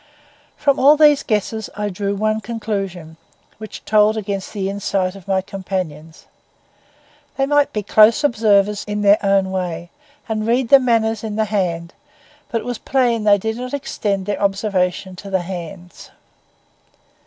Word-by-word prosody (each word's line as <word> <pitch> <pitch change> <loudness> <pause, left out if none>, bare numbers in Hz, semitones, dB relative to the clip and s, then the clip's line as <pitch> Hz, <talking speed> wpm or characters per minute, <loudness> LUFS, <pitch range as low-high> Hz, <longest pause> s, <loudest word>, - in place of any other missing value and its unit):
From 280 -2 +1
all 290 +3 +6
these 295 -2 +5
guesses 220 0 -2
I 210 0 -2
drew 200 +1 -3
one 215 +2 0
conclusion, 195 -8 -5 0.4
which 215 -1 -9
told 215 +1 +3
against 200 -2 -4
the 195 -3 -3
insight 195 -1 -2
of 195 -2 -14
my 190 -1 +1
companions. 180 -5 -6 1.1
They 270 - +2
might 290 0 +2
be 210 - -3
close 215 +6 +5
observers 210 -5 +2
in 210 0 -3
their 205 +1 +4
own 195 -1 +2
way, 175 -2 -4 0.4
and 220 -1 -2
read 240 +1 +1
the 275 - +8
manners 225 -3 +1
in 215 -2 -4
the 220 0 +1
face; 185 -5 -1 0.7
but 230 - -2
it - - -11
was 245 -2 -4
plain 240 -5 0
that 205 - +6
they 220 - -1
did 220 - -8
not 255 +2 -4
extend 200 -8 -3
their 205 - -3
observation 195 -2 -1
to 200 - -9
the 190 -1 0
hands. 175 0 -9
205 Hz, 160 wpm, -19 LUFS, 190-225 Hz, 1.1 s, the